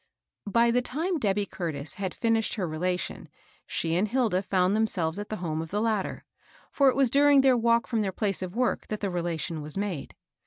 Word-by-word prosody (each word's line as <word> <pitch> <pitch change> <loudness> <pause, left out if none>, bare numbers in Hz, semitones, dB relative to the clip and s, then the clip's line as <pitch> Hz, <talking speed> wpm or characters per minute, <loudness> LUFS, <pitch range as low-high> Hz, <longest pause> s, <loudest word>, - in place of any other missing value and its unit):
By 235 +3 +4
the 250 +1 +2
time 325 +7 -2
Debby 205 -3 +1
Curtis 155 -7 -4
had 190 -1 -4
finished 225 -1 +1
her 190 -5 -2
rela 180 +3 -1
tion, - - -6 0.4
she 165 0 -1
and 190 +5 +2
Hilda 225 -6 +1
found 190 0 +1
themselves 190 -5 +1
at 205 - -6
the 215 - -2
home 160 -5 -3
of 165 - -7
the 205 - -1
latter; 215 -3 -1 0.5
for 275 -2 +4
it - - 0
was 270 -3 +2
during 285 0 +6
their 265 -1 +5
walk 235 0 +2
fi*om 230 -3 -1
their 195 -2 -1
place 195 -1 -1
of 185 +1 -5
work 250 +1 0
that 215 - -4
the 200 -2 -1
relation 170 -2 -3
was 150 +2 -2
made. 195 -7 -4
205 Hz, 210 wpm, -27 LUFS, 175-235 Hz, 0.5 s, during